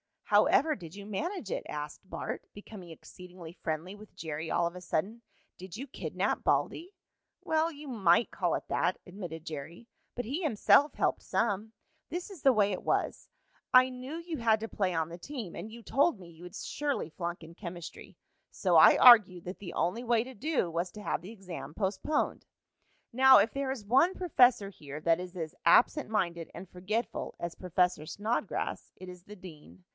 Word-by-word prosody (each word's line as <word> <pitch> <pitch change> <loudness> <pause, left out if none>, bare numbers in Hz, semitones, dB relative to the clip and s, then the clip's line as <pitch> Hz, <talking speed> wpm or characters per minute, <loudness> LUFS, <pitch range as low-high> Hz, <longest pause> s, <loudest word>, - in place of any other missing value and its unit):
"How - - +4
ever 310 +1 +3
did 170 -2 -11
you 200 0 -9
manage 270 - -4
it?" - - -2
asked 150 0 -6
Bart, - - -5
becoming 205 -3 -11
exceedingly 175 +1 -12
friendly 165 +1 -4
with 215 0 -15
Jerry 160 0 -5
all 175 - +1
of 170 +2 -4
a - - -9
sudden. 190 +6 -2 0.4
"Did 185 -1 -9
you 255 +5 -5
kidnap - - -2
Baldy?" 360 +5 0 0.5
"Well, 320 +1 +1
you 295 -1 -11
might 215 -4 +3
call - - 0
it - - -4
that," - - +1
admitted 175 -4 -8
Jerry. 160 +8 -8 0.3
"But 245 - -3
he 275 - -3
himself 290 - +4
helped - - 0
some. 220 0 -1 0.4
This 350 +5 -5
is 365 -7 -11
the 270 - +5
way 205 -2 +3
it 185 - -3
was. - - -1 0.5
I 255 0 +7
knew 255 +4 -7
you 335 -1 -5
had 220 -3 +2
to 225 - -5
play 190 -3 -1
on 160 -1 -1
the 170 - -8
team, 230 -2 -7
and 220 - -7
you 230 +1 -11
told 280 +4 +2
me 175 -2 -12
you 170 +1 -15
would 180 0 -10
surely 285 - -3
flunk 170 +1 -5
in 165 +1 -12
chemistry. 175 -2 -9 0.3
So - - +2
I - - +8
argued 205 -8 +8
that 180 +2 -7
the 180 -4 -8
only 180 +8 -1
way 235 -2 +2
to 260 +2 -10
do 255 - -1
was 170 +2 -2
to 210 - -9
have - - -1
the 185 +5 -9
exam 180 -8 -8
postponed. 210 - -1 0.7
"Now, 265 +2 +7
if 210 +3 +2
there 275 -1 -3
is 255 -6 -4
one 270 - +4
professor 250 - +3
here 150 -5 -9
that 165 +1 +2
is 180 0 -8
as 160 -3 -5
absent 240 - +4
minded 170 -6 -1
and 175 +1 -9
forgetful 200 +5 -3
as 170 -1 -4
Professor 180 -3 0
Snodgrass, 210 +4 -3
it 185 0 -10
is 180 0 -12
the 210 - -11
dean. 150 - -13
200 Hz, 190 wpm, -30 LUFS, 175-250 Hz, 0.7 s, I